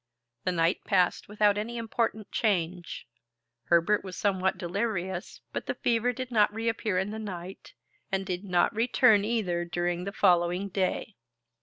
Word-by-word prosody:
The - - +2
night 170 0 +1
passed 185 -4 +1
without 210 0 +2
any 235 +3 -4
important 225 -2 -2
change. 180 - -1 0.6
Herbert 170 +5 +3
was 185 -2 -7
somewhat 190 -2 +1
delirious, 190 0 -3
but - - -4
the - - -1
fever 240 +1 +1
did 255 +1 -6
not 210 -3 +4
reappear 225 -2 -1
in 190 +3 0
the 220 - -5
night, 190 -3 -8 0.4
and 195 0 -1
did 180 0 -3
not 180 -3 +2
return 225 -2 +4
either 205 -6 0
during 175 +1 -2
the 200 - -3
following 180 0 +2
day. 195 +2 -2
195 Hz, 150 wpm, -28 LUFS, 180-220 Hz, 0.6 s, not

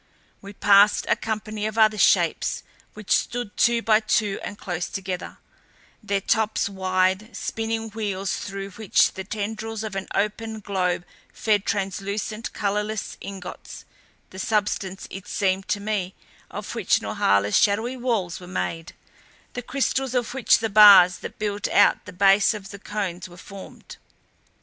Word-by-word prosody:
We 200 +1 -10
passed 200 +1 +5
a - - +4
company 215 -1 -4
of 220 +1 -6
other 215 -1 +4
Shapes - - +2 0.3
which 215 -2 -9
stood 245 -4 0
two 235 -1 +2
by 215 -1 +4
two 215 -2 0
and 205 - -7
close 175 -4 -4
together, 185 -2 -5 0.6
their 200 -1 -1
tops 220 +1 +1
wide 190 +2 0
spinning 225 0 -3
wheels 200 -3 -3
through 195 0 -6
which 215 0 +2
the 190 - -6
tendrils 220 +2 -4
of 215 -3 -5
an 195 0 -4
opened 215 +1 -2
globe 180 -3 -1 0.3
fed 210 -3 0
translucent, 200 +2 -3
colorless 210 0 -2
ingots 190 -2 -9 0.5
the 190 - -9
substance 200 -2 -1
it 195 -1 -8
seemed 190 -1 -1
to 205 - 0
me 200 -3 -3 0.3
of - - -7
which - - +2
Norhala's 100 +1 +1
shadowy 220 +5 +2
walls 230 -9 -2
were 180 - -11
made, 165 - -4 0.6
the 245 - -4
crystal 265 +1 -1
of 240 0 -6
which 265 -3 +4
the 225 -1 -2
bars 200 -4 +8
that - - -8
built 205 -1 -2
out - - +3
the - - -9
base 195 +3 +4
of 195 -2 -9
the 200 - -9
Cones 190 -4 -4
were 175 - -14
formed. 195 +1 -12
205 Hz, 150 wpm, -24 LUFS, 190-220 Hz, 0.6 s, bars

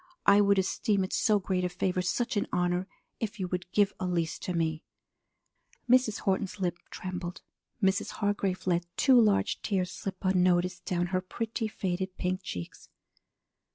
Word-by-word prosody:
I 200 +1 +7
would 200 -1 +4
esteem 195 +1 +1
it 185 - -4
so 215 -1 +3
great 185 -2 -1
a 180 - +1
favor, 180 +1 -1
such 235 +7 -1
an 205 - 0
honor, 180 +1 0 0.3
if 215 -2 -4
you 185 - -1
would 180 0 -4
give 205 0 +3
Elise 175 -3 -1
to - - -4
me.'" 160 -1 -1 1.0
Mrs. 250 -3 +3
Horton's 195 0 -1
lip 175 -2 -1
trembled. 180 -1 -6 0.4
Mrs. 190 +2 +1
Hargrave 200 -3 -1
let 175 -1 +1
two 260 -3 +6
large 210 -3 +2
tears 185 -3 -1
slip 190 -1 -5
unnoticed 180 -1 +2
down 175 -1 0
her 185 - +2
pretty, 225 +4 -3
faded 190 -2 -3
pink 185 +1 -1
cheeks. 90 - -7
185 Hz, 155 wpm, -29 LUFS, 180-205 Hz, 1.0 s, I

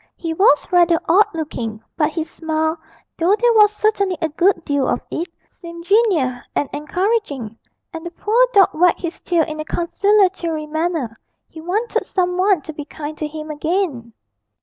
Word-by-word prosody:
He 330 -1 -4
was 320 -4 +4
rather 345 -2 +4
odd 400 +6 +5
looking, 235 -9 -4 0.2
but 300 -2 +1
his 320 0 -4
smile, 315 0 -2 0.4
though 355 +5 +4
there 475 +1 +3
was 420 -2 +6
certainly 415 -3 0
a 320 - -1
good 340 +2 +1
deal 285 -2 0
of - - 0
it, 335 +2 -3 0.2
seemed 340 -1 -11
genial 355 - +2 0.2
and 290 - 0
encouraging, 300 - -2 0.4
and 325 -1 -7
the 345 - -5
poor 445 +8 +2
dog 400 -5 +6
wagged 350 +2 +3
his 335 -1 -5
tail 340 -2 +1
in 310 0 -6
a - - -2
conciliatory 355 -2 +1
manner 315 -6 -2 0.3
he 320 - -11
wanted 415 +8 -2
some 360 -2 0
one 370 -4 +2
to 315 - -8
be 295 - -6
kind 300 +1 -7
to 305 - -2
him 310 0 -7
again. 300 - -2
335 Hz, 170 wpm, -19 LUFS, 310-385 Hz, 0.4 s, was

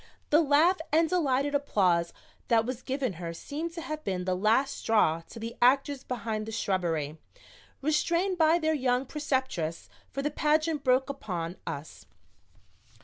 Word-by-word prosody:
The 305 +2 +6
laugh 320 +5 +4
and 325 +2 +4
delighted 285 -5 +1
applause 185 -12 +2 0.4
that 225 -2 +3
was 255 0 -4
given 260 -5 -2
her 170 -1 -4
seemed 315 - -5
to 335 - -6
have 310 -1 -5
been 180 -2 -2
the 185 - +1
last 225 +9 +2
straw 165 -8 +2
to - - -11
the 230 +1 -6
actors 270 +2 +3
behind 220 -3 -3
the - - -5
shrubbery, 170 -8 -1 0.6
restrained 340 +5 +1
by 320 +1 +5
their 315 -2 +1
young 255 -2 +1
preceptress, 260 - -2 0.2
for 275 - -4
the 295 - 0
pageant 310 0 +1
broke 260 +1 +2
upon 180 -9 -5
us. 145 +2 -7
260 Hz, 150 wpm, -29 LUFS, 200-300 Hz, 0.6 s, The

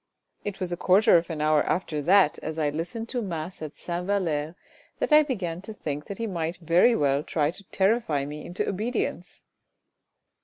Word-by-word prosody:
It 205 -2 -5
was 185 -2 -3
a - - -3
quarter 190 +4 +5
of 170 +1 -2
an 160 -2 -4
hour 155 0 +4
after 160 -4 -1
that 185 0 +4
as 160 0 -5
I 150 -2 +1
listened 175 +10 -4
to 245 - -1
mass 175 -3 -5
at 155 -1 -6
Sainte 175 +1 -4
Valere 165 -6 -1 0.4
that - - 0
I 305 - +9
began 190 - -3
to 215 +2 -9
think 150 -5 -4
that 200 - -7
he 230 - -2
might 170 -4 -3
very 175 +8 +4
well 140 -1 +2
try 150 0 0
to 195 +3 -14
terrify 190 - +1
me 150 +1 -7
into 175 - -3
obedience." 215 +6 -3
175 Hz, 190 wpm, -26 LUFS, 155-200 Hz, 0.4 s, I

